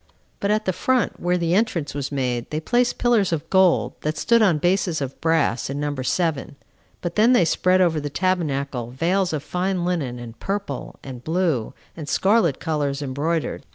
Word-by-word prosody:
But 200 - -1
at 215 +1 +1
the 185 - +1
front, 250 +4 0
where 180 0 +1
the 170 -1 0
entrance 185 -7 0
was 140 0 -4
made, 125 -4 -2
they 155 - -2
placed 245 +9 +1
pillars 230 -7 +2
of 165 -1 -2
gold, 190 -2 +3
that 155 0 -2
stood 230 +8 +3
on 185 -7 +4
bases 175 0 +1
of 135 -2 -5
brass, 160 -8 +1
in 140 +1 -3
number 145 -2 -2
seven; 150 +1 -1 0.5
but 175 -1 -3
then 225 +5 +4
they 185 -9 +5
spread 185 +3 +2
over 165 -4 +2
the 145 0 -4
tabernacle 140 -8 -1
veils 175 +8 0
of 150 -3 -3
fine 180 +1 -1
linen 150 -9 -2
and 115 -1 -10
purple, 195 -9 -4
and 125 -3 -8
blue, 160 -7 -1 0.2
and 155 -3 -7
scarlet 195 - +2
colors, 145 -3 -2
embroidered. 150 +5 -2
165 Hz, 185 wpm, -23 LUFS, 140-185 Hz, 0.5 s, they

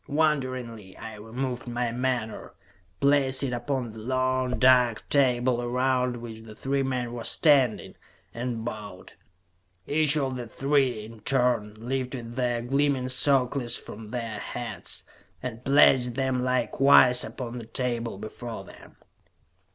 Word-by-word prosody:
Wonderingly, 130 -9 -1
I 110 - -8
removed 125 +4 -4
my 120 0 -1
menore, 125 -2 -3 0.4
placed 140 -1 +3
it 130 -2 -1
upon 120 0 -2
the 110 - -10
long, 130 +1 0
dark 125 -3 +4
table 125 -3 +2
around 125 0 0
which 115 -2 -8
the 110 -1 -12
three 135 +4 -1
men 125 -3 -2
were 120 -1 -5
standing, 135 -7 +3 0.4
and 120 -1 -4
bowed. 105 -5 -7 0.7
Each 155 0 +3
of 135 -3 -1
the 120 -1 -6
three, 135 -3 0
in 115 0 -12
turn, 120 -3 +1
lifted 125 0 -4
their 120 -2 0
gleaming 135 0 +1
circlets 130 -2 +1
from 110 +1 -9
their 115 -2 -4
heads, 120 +4 -5 0.4
and 120 -1 -6
placed 130 -3 +5
them 130 -1 0
likewise 125 0 +5
upon 125 -1 -6
the 115 - -10
table 120 -3 -3
before 110 +2 -7
them. - - -15
125 Hz, 130 wpm, -26 LUFS, 115-130 Hz, 0.7 s, placed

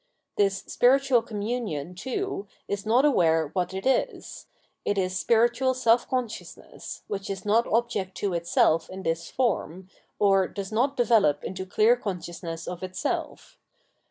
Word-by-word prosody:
This 195 -1 +1
spiritual 265 -1 +3
communion, 210 - -4
too, 260 - -4 0.2
is 200 +1 -4
not 245 +6 +4
aware 165 - +3
what 180 -1 -1
it 190 0 -5
is; - - -1 0.4
it 205 - -1
is 185 -1 0
spiritual 240 +5 +2
self 235 -1 +3
consciousness, 250 -4 -5
which 195 -1 -5
is 195 0 -5
not 225 +3 +3
object 220 -5 0
to 200 -3 -1
itself 165 -1 +2
in 190 0 -8
this 165 -1 -2
form, 190 - -2 0.3
or 195 -2 +3
does 200 0 -6
not 260 +6 +1
develop 220 - +3
into 190 0 -5
clear 220 +5 +4
conscious 180 -7 -6
ness 165 -2 -5
of 180 -1 -5
itself. 185 0 -4
200 Hz, 145 wpm, -26 LUFS, 185-240 Hz, 0.4 s, not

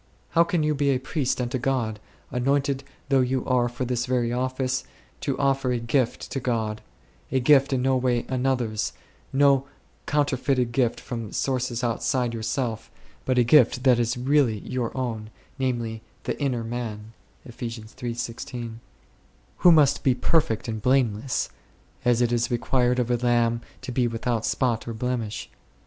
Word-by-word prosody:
How 170 - +5
can 170 -3 0
you 150 0 +2
be 140 -1 +1
a 135 - +3
priest 130 0 -1
unto 125 +1 -1
God 120 -4 -1 0.3
2, 125 - -3
anointed 140 +1 +1 0.3
though 135 -1 +4
you 130 0 0
are 125 -2 +2
for 120 +2 -4
this 125 0 -1
very 120 -2 +1
office, 130 +1 -1 0.4
to 140 - -2
offer 135 -2 +1
a 125 - +1
gift 120 +1 -1
to 135 - -1
God; 110 -4 -1 0.5
a 130 - +2
gift 135 +1 +5
in 130 -2 +1
no 135 0 +3
way 125 -2 +1
another's, 125 -4 0 0.4
no 140 -1 +4 0.4
counterfeited 135 -4 +1
gift 120 -1 +1
from 115 -4 -6
sources 130 -2 -1
outside 120 +1 0
yourself, 115 0 -2 0.4
but 130 -1 +1
a 125 - +6
gift 125 0 +5
that 125 -3 +5
is 120 +1 0
really 130 -3 +2
your 125 -3 -2
own, 115 -4 -3 0.3
namely, 120 -4 -1
" - - -35
the - - -3
inner 130 -5 0
man 115 -2 -5 0.3
3," 115 -2 -6 1.7
who 175 - +7
must 145 -3 +5
be 130 -2 +3
perfect 125 -4 +1
and 110 -2 -3
blameless, 125 -1 +1 0.6
as 120 0 +3
it 120 - +1
is 120 0 +1
required 125 0 +1
of 125 -1 0
a 120 - +3
lamb 120 -1 +2 0.2
to - - -5
be 125 0 +2
without 115 0 -1
spot 120 -3 0
or 115 - -4
blemish 120 -2 -3
125 Hz, 160 wpm, -25 LUFS, 115-135 Hz, 1.7 s, who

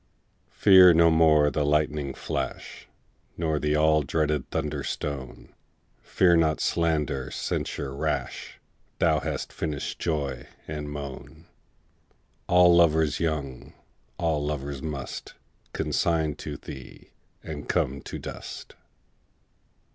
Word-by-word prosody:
Fear 95 -4 +7
no 85 0 +6
more 80 -2 +4
the 75 - 0
lightning 75 -1 0
flash, - - -5 0.5
Nor 80 -2 0
the 75 0 0
all 75 0 +4
dreaded 75 0 -1
thunder 75 -3 -2
stone; 70 -3 -5 0.5
Fear 85 -2 +3
not 80 -2 +2
slander, 75 -6 0
censure 70 -1 -3
rash; - - -3 0.4
Thou - - +3
hast - - -4
finish'd 75 -3 -4
joy 70 -6 -2 0.2
and 75 -1 -5
moan: 70 -2 -8 1.0
All 90 -1 +6
lovers 80 -3 +3
young, 75 -6 -3 0.4
all 80 -3 0
lovers 70 -2 -4
must 70 -4 -6 0.4
Consign 80 -3 0
to - - -6
thee, 65 -1 -11 0.3
and - - -7
come 70 +2 0
to - - -7
dust. - - -8
75 Hz, 110 wpm, -26 LUFS, 70-80 Hz, 1.0 s, Fear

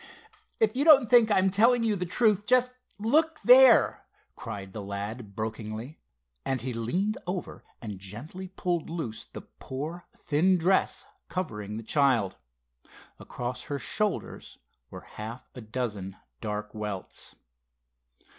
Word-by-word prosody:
"If 445 - +2
you 275 - +1
don't 280 -6 +7
think 235 -3 +7
I'm 190 -2 +3
telling 230 +4 +4
you 220 -2 +2
the 180 -2 -3
truth, 210 +1 +2
just 250 0 +4 0.3
look 310 +10 +2
there!" 250 0 +7 0.3
cried 95 -2 -7
the 110 - -5
lad 100 +2 -6
brokenly, 110 +5 -5 0.4
and 135 -1 -1
he 125 +2 -4
leaned 180 - -1
over 180 0 -5 0.2
and 105 -4 -6
gently 130 - -8
pulled 175 -3 -2
loose 160 -10 -4
the - - -10
poor 155 +7 -7
thin 180 +6 +2
dress 180 +3 +1 0.2
covering 105 - -4
the 115 - -6
child. 125 -7 +2 0.8
Across 125 +1 -5
her 145 - -3
shoulders 210 +7 -2 0.3
were - - -9
half 115 +4 -9
a 125 - -9
dozen 105 -4 -4 0.2
dark 105 +3 -4
welts. 105 -3 -6
140 Hz, 130 wpm, -28 LUFS, -, 0.8 s, don't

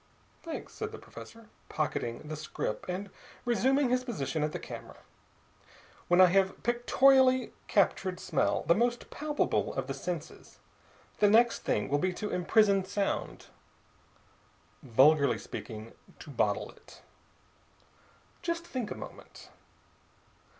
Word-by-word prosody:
"Thanks," 330 -2 -7
said 435 0 -5
the 435 - -8
professor, 230 -1 -12 0.2
pocketing 150 -4 -3
the 155 - -4
scrip 145 -7 -4
and 190 +2 -4 0.3
resuming 260 +2 +2
his 255 0 +2
position 165 - -3
at 150 0 0
the - - -4
camera. - - -9 1.1
"When 175 +1 +4
I 185 - +10
have 190 +1 +1
pictorially 255 +1 +4
captured 190 -2 +1
smell, 180 - 0
the 165 - +4
most 240 +4 -1
palpable 295 0 -1
of 135 - -2
the 135 - -4
senses, 165 +3 -6 0.6
the 205 - +5
next 230 +3 +4
thing 105 - -1
will 145 +1 +1
be 185 +4 0
to 210 +3 -4
imprison 200 +2 +3
sound 200 +1 -3 1.4
vulgarly 140 +3 +4
speaking, 110 0 -8 0.2
to - - -11
bottle - - 0
it. - - -18 1.4
Just 335 0 -3
think 250 -9 -4
a - - -5
moment. - - -11
195 Hz, 125 wpm, -30 LUFS, 155-245 Hz, 1.4 s, I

